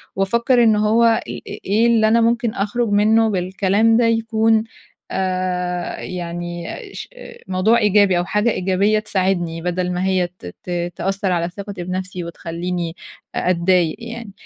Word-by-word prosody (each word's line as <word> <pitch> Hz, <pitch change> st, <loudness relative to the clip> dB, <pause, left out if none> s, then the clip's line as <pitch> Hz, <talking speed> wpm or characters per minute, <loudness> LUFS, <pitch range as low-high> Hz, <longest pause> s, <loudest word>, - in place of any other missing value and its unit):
وأفكّر 235 Hz, +6 st, +2 dB
إنه 215 Hz, -2 st, +3 dB
هو 230 Hz, +2 st, +4 dB
إ 230 Hz, -1 st, +5 dB, 0.3 s
إ -, -, -7 dB
إيه 215 Hz, +4 st, +3 dB
اللي 225 Hz, -2 st, +4 dB
أنا 230 Hz, +2 st, +4 dB
ممكن 235 Hz, 0 st, +1 dB
أخرج 215 Hz, +3 st, -1 dB
منه 220 Hz, +2 st, +3 dB
بالكلام 195 Hz, +4 st, +2 dB
ده 240 Hz, -, +3 dB
يكون 225 Hz, -1 st, +2 dB, 0.5 s
آآ، 180 Hz, -1 st, -2 dB
يعني 175 Hz, -1 st, -5 dB, 0.3 s
ش -, -, -7 dB, 0.4 s
موضوع 190 Hz, +5 st, +3 dB
إيجابي 205 Hz, -4 st, +4 dB
أو 175 Hz, -, 0 dB
حاجة 210 Hz, +4 st, +1 dB
إيجابية 195 Hz, +3 st, +1 dB
تساعدني، 185 Hz, -5 st, -1 dB
بدل 180 Hz, +1 st, -1 dB
ما 180 Hz, +1 st, -2 dB
هي 185 Hz, -2 st, +1 dB
ت 180 Hz, +1 st, -17 dB, 0.2 s
ت 175 Hz, -1 st, -3 dB
تأثَّر 195 Hz, +2 st, -1 dB
على 170 Hz, -1 st, 0 dB
ثِقتي 200 Hz, 0 st, -7 dB
بنفسي 185 Hz, 0 st, -4 dB
وتخليني 170 Hz, 0 st, -4 dB, 0.4 s
أ -, -, 0 dB
أتضايق 175 Hz, -2 st, +2 dB
يعني، 230 Hz, -2 st, -8 dB
190 Hz, 150 wpm, -20 LUFS, 180-220 Hz, 0.5 s, إ